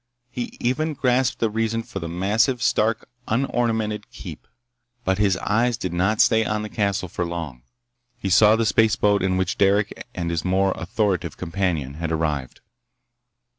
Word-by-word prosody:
He 120 -1 -5
even 150 +6 0
grasped 125 -1 +1
the 115 -2 0
reason 115 +1 -1
for 100 - -7
the 85 -2 -5
massive, 105 - +1
stark, 110 +1 +1 0.2
unornamented 115 -3 -1
keep. - - -10 0.6
But 95 -1 0
his 100 -3 +3
eyes 115 +5 +1
did 90 -2 -4
not 95 +5 +2
stay 110 0 +4
on 105 0 -2
the 105 - -5
castle 100 -4 -1
for 90 - -3
long. 85 -7 -5 0.6
He 100 -5 -3
saw 105 +4 +6
the 115 0 +1
spaceboat 105 -2 +3
in 95 0 +1
which 95 0 -1
Derec 100 +1 +3 0.2
and 85 -1 -2
his 85 -1 -2
more 95 +1 +2
authoritative 95 +1 -1
companion 85 -6 -2
had 80 -1 -2
arrived. 75 -5 -2
100 Hz, 160 wpm, -23 LUFS, 90-115 Hz, 0.6 s, saw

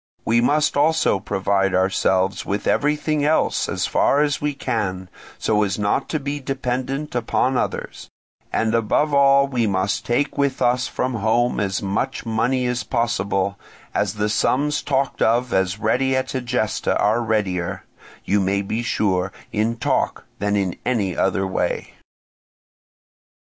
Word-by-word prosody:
We 115 +1 +3
must 150 +5 +2
also 155 -7 +3
provide 95 0 0
ourselves 95 0 +1
with 100 +1 -3
everything 150 0 +1
else 155 +2 +1
as - - -1
far 145 - +2
as 145 -1 0
we 145 -1 -1
can, 100 -9 -3 0.3
so 105 -1 +1
as 100 -2 0
not 105 -1 0
to 155 - -1
be 140 +1 -3
dependent 135 +2 -3
upon 125 +2 0
others; - - -3 0.4
and 110 0 0
above 115 +6 +1
all 140 0 +5
we 125 -5 0
must 95 0 0
take 140 +4 -1
with 140 -2 +1
us 125 +1 +2
from 130 0 -2
home 115 +2 +1
as 95 -1 -1
much 100 +4 -2
money 120 +3 0
as 125 0 -1
possible, 100 -5 -1 0.3
as 105 0 0
the 105 0 0
sums 145 +7 +1
talked 135 -1 -1
of 120 +2 +2
as 95 0 +1
ready 130 +5 +1
at 130 - -1
Egesta 125 -4 -1
are 110 +3 +2
readier, 100 -6 -1 0.4
you 100 - +2
may 100 +1 0
be 110 +4 -2
sure, 95 -5 0 0.2
in 110 +3 0
talk - - -1
than 100 +1 0
in 95 -3 0
any 105 -8 0
other 95 0 +1
way. 95 - -2
115 Hz, 150 wpm, -21 LUFS, 100-135 Hz, 0.4 s, all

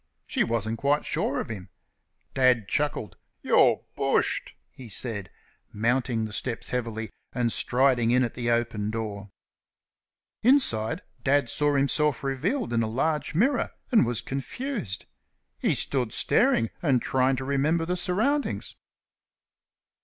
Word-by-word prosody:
She - - +1
wasn't 115 -1 -1
quite 145 +1 +1
sure 140 - -1
of - - -4
him. 95 -4 -7 0.6
Dad 125 -5 +3
chuckled. 145 -2 -2 0.3
"You're - - +4
bushed!" - - 0 0.2
he 125 -3 -12
said, 105 -5 -4 0.4
mounting 115 +1 0
the 110 - -7
steps 115 +1 -1
heavily 115 -3 -3 0.2
and 120 -2 0
striding 125 -2 +2
in 125 +2 +4
at 120 - -2
the 120 -1 -2
open 115 -3 0
door. 105 -2 -4 1.1
Inside 115 - +2 0.2
Dad 140 -2 +2
saw 145 -1 +2
himself 140 0 +1
revealed 150 - -1
in 115 - +2
a 110 - 0
large 150 +6 -1
mirror, 245 - +2 0.2
and 235 - +6
was 120 -2 -1
confused. 135 - -4 0.5
He - - +1
stood 125 -5 0
staring 115 -1 +3
and 140 -7 +3
trying 130 +2 +1
to 130 +1 -4
remember 150 +4 +1
the 180 +2 -1
surroundings. 220 +12 0
125 Hz, 130 wpm, -26 LUFS, 115-145 Hz, 1.1 s, and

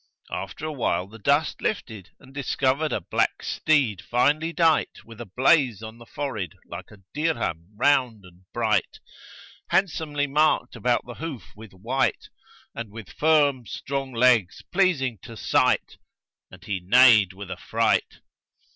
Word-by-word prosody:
After 95 +10 -5
a 155 - -3
while 100 - -1
the 110 +4 -14
dust 145 +7 +1
lifted 110 - -4
and 135 0 -17
discovered 140 +2 0
a - - 0
black - - -1
steed 135 - +1
finely 150 +7 +1
dight 165 -2 +1
with 115 0 -11
a 120 - -8
blaze 125 - +2
on 110 +1 -9
the 120 - -14
forehead 110 - -5
like - - -9
a 105 - -16
dirham 145 - -2
round 125 -6 +2
and 90 0 -19
bright;[FN#137] - - 0 0.7
handsomely 160 -6 0
marked 145 -3 +1
about 120 +1 0
the 120 - -8
hoof 140 - -7
with 110 -2 -13
white 120 +8 -1 0.4
and 115 -2 -6
with 110 0 -10
firm 145 -6 +2
strong 135 -1 -4
legs 120 -6 +2
pleasing 150 - +1
to 115 - -11
sight - - +1 0.5
and 95 0 -15
he 100 -3 -2
neighed 105 0 +5
with 100 0 -9
affright. - - -1
125 Hz, 145 wpm, -24 LUFS, 105-145 Hz, 0.7 s, neighed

